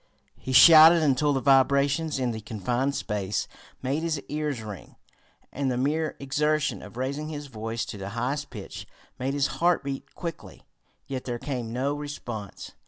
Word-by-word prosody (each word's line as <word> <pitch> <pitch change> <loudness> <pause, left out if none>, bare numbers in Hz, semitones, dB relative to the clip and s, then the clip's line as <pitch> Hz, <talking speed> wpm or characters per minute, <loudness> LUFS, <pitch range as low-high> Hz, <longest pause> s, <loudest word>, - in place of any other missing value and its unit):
He 130 - -5
shouted 160 +4 +9
until 145 0 +2
the 135 -2 0
vibrations 140 +3 +3
in 125 -2 0
the 110 -1 -6
confined 120 +7 -2
space 105 -2 -2 0.4
made 135 +4 -1
his 165 -3 -1
ears 150 -5 -2
ring, 105 -3 -9 0.6
and 140 -1 -1
the 125 - -1
mere 150 +4 0
exertion 150 +2 0
of - - -12
raising 140 +4 -3
his 150 -1 -6
voice 115 -3 -4
to 100 - -8
the 95 +1 -5
highest 125 +6 -3
pitch - - -8 0.3
made 135 +2 -1
his 140 -1 +2 0.2
heart 175 -3 +3
beat 135 -1 -6
quickly. 170 -3 -7 0.4
Yet 130 -2 -5
there 120 -2 -3
came 120 -3 -4
no 130 +4 -1
response. 125 -8 -7
135 Hz, 165 wpm, -26 LUFS, 120-150 Hz, 0.6 s, shouted